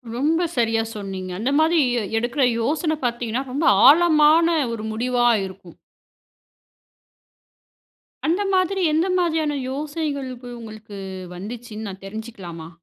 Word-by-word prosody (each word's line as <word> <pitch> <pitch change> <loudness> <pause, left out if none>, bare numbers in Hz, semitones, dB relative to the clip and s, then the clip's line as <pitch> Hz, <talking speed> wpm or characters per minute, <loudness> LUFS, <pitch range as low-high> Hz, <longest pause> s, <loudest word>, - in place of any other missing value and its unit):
ரொம்ப 315 +6 +1 0.2
சரியா 225 -1 +2
சொன்னீங்க. 190 -2 -6
அந்த 255 +5 0
மாதிரி 325 +2 +3 0.2
எ - - -2 0.2
எடுக்குற 245 +4 0 0.2
யோசனை 310 +5 0
பாத்தீங்கன்னா, 240 +1 -2
ரொம்ப 290 +4 -1 0.2
ஆழமான 325 +1 +5 0.2
ஒரு 215 -1 -5
முடிவா 240 +2 +1 0.2
இருக்கும். 185 -2 -12 2.5
அந்த 345 +6 +1
மாதிரி 375 +1 +1
எந்த 330 +4 +2
மாதிரியான 315 -4 0
யோசனைகளுக்கு 280 -4 -4
உங்களுக்கு 215 -2 -10 0.4
வந்துச்சுன்னு 220 +2 -7
நான் 190 0 -10
தெரிஞ்சுக்கலாமா! 195 -6 -8
250 Hz, 110 wpm, -22 LUFS, 220-315 Hz, 2.5 s, ஆழமான